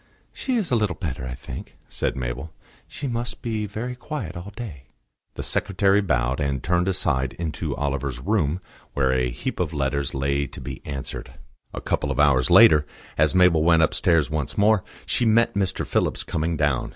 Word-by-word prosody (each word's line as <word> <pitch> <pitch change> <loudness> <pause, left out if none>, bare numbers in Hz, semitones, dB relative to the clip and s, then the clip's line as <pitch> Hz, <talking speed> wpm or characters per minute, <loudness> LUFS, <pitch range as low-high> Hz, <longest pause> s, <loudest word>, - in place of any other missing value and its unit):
"She 260 - -2
is 210 - 0
a - - +4
little 105 -5 +1
better, 70 -7 -4
I 60 - -5
think," 65 - -9
said - - -2
Mabel. 65 +5 -4 0.4
"She 145 - -7
must 120 -1 -4
be 110 -3 -2
very 125 +5 -4
quiet 125 - -5
all 85 +4 -7
day." 85 - -7 0.5
The - - -4
secretary 100 +1 +2
bowed 65 -7 0
and 70 -4 -1
turned 90 +1 +1
aside 70 -9 0
into 80 -4 -3
Oliver's 70 -2 -2
room, 85 +1 0 0.3
where 65 -2 +2
a 65 -1 +1
heap - - -4
of 85 -3 -1
letters 70 -1 -1
lay 70 +1 0
to - - -11
be 65 -2 -7
answered. 70 -3 -6 0.4
A - - -6
couple 70 - -1
of 70 -1 -2
hours 65 -4 +4
later, 75 -2 +8 0.3
as 80 +3 +2
Mabel 90 -4 +5
went 80 0 +5
upstairs 80 0 +3
once 75 -3 -3
more, 105 -1 +4 0.2
she - - 0
met 115 +1 +4
Mr. 95 -2 -1
Phillips - - 0
coming 80 +1 -1
down. 75 -4 +1
80 Hz, 180 wpm, -24 LUFS, 70-100 Hz, 0.5 s, later